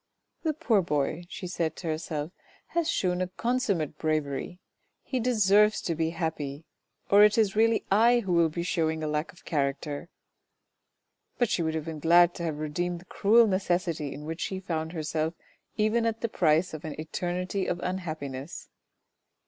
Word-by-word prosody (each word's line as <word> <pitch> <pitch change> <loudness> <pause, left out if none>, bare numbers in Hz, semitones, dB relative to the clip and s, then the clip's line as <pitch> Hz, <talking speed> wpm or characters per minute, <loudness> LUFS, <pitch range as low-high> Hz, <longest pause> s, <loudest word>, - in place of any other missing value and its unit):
" - - -51
The 315 -2 0
poor 225 -8 +2
boy," 155 +1 -1
she 195 - -7
said 165 -3 -2
to 175 - -7
herself, 155 0 -3 0.2
" - - -31
has 335 -1 +1
shewn 180 - 0
a 185 - 0
consummate 195 - -1
bravery. 155 +2 -2 0.4
He 260 - -2
deserves 210 -3 +4
to 170 - 0
be 160 0 0
happy 160 -3 -4 0.5
or 200 +1 +8
it 210 +1 +5
is 210 -3 +2
really 225 +1 +3
I 235 +4 +5
who 190 -5 -2
will 170 -1 +4
be 170 +2 -3
shewing 160 -3 0
a - - -1
lack 150 +5 -2
of 180 - -21
character." 145 +1 -2 1.3
But 240 -3 +1
she - - +1
would 160 -1 -1
have 155 -1 -3
been 160 -2 -5
glad 175 +2 +5
to 170 - -6
have 160 -3 -2
redeemed 170 +4 -2
the - - -17
cruel 225 +5 +4
necessity 175 -6 0
in 150 - -8
which 160 +2 -5
she 190 - -2
found 160 -4 -3
herself 160 0 -2 0.4
even 225 +2 +2
at 225 0 -2
the 230 - -1
price 165 -2 +2
of 155 - -7
an 155 -1 -6
eternity 180 +4 -2
of 175 - -1
unhappiness. 155 -6 -5
175 Hz, 180 wpm, -28 LUFS, 155-200 Hz, 1.3 s, or